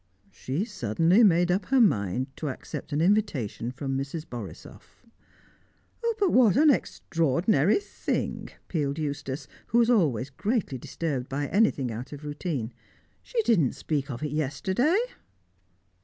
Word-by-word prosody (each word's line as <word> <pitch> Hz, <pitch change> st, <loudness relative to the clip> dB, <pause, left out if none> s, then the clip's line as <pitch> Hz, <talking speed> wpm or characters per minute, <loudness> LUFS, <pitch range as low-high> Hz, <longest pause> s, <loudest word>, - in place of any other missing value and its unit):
"She 140 Hz, -, -3 dB
suddenly 180 Hz, -, +2 dB
made 175 Hz, -3 st, +4 dB
up 190 Hz, +3 st, 0 dB
her 270 Hz, -1 st, +3 dB
mind 130 Hz, -, +1 dB
to 150 Hz, -, -3 dB
accept 135 Hz, -, -7 dB
an 145 Hz, +2 st, 0 dB
invitation 165 Hz, -, +1 dB
from 135 Hz, 0 st, -4 dB
Mrs. 140 Hz, +4 st, -4 dB
Borisoff." 115 Hz, -5 st, -10 dB, 1.1 s
"But 400 Hz, -4 st, +2 dB
what 240 Hz, -4 st, +5 dB
an 300 Hz, +1 st, +7 dB
extraordinary 165 Hz, -, +1 dB
thing!" 410 Hz, -, -3 dB, 0.2 s
pealed 145 Hz, -4 st, -1 dB
Eustace, 145 Hz, -2 st, -4 dB, 0.2 s
who 235 Hz, -, +1 dB
was 235 Hz, 0 st, +5 dB
always 140 Hz, -, +2 dB
greatly 200 Hz, -, -1 dB
disturbed 135 Hz, -2 st, -3 dB
by 145 Hz, +1 st, -2 dB
anything 185 Hz, -, +2 dB
out 120 Hz, +6 st, -6 dB
of 145 Hz, +1 st, -9 dB
routine. 145 Hz, -, -3 dB, 0.5 s
"She 470 Hz, -2 st, -1 dB
didn't 175 Hz, -, +3 dB
speak 140 Hz, 0 st, -2 dB
of 130 Hz, +2 st, -5 dB
it 150 Hz, -, -2 dB
yesterday!" 155 Hz, -, +1 dB
150 Hz, 135 wpm, -27 LUFS, 135-205 Hz, 1.1 s, an